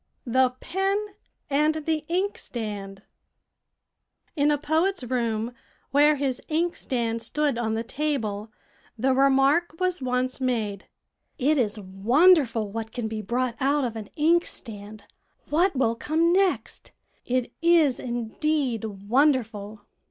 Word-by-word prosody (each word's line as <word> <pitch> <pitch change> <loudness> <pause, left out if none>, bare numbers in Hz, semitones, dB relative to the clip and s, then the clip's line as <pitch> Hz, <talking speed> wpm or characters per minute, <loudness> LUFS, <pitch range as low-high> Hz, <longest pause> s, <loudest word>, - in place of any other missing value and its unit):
THE 255 +1 +2
PEN 385 +2 0 0.5
AND 300 +2 +2
THE 315 -1 0
INKSTAND 215 - -3 1.3
In 290 -1 +3
a 295 - +3
poet's 320 +4 0
room, 235 -2 -1 0.4
where 295 +2 +5
his 270 -3 -2
inkstand 255 -8 -1
stood 285 +1 -1
on 220 -2 -1
the 225 - -2
table, 230 -6 -3 0.5
the 260 +4 +2
remark 275 +5 +3
was 365 -3 0
once 255 +1 -1
made, 220 -6 -2 0.5
"It 290 +2 +2
is 215 -3 0
wonderful 230 - +3
what 225 +1 -5
can 235 -1 -3
be 220 0 -4
brought 240 +3 -1
out 280 +1 +2
of 230 -2 -4
an 215 -2 -7
inkstand. 225 -10 -1 0.5
What 345 +3 +3
will 240 -3 +2
come 320 +8 +1
next? 380 -1 0 0.3
It 250 -1 -1
is 330 -6 +4
indeed 240 +1 -1
wonderful." 215 -1 0
255 Hz, 120 wpm, -25 LUFS, 225-305 Hz, 1.3 s, where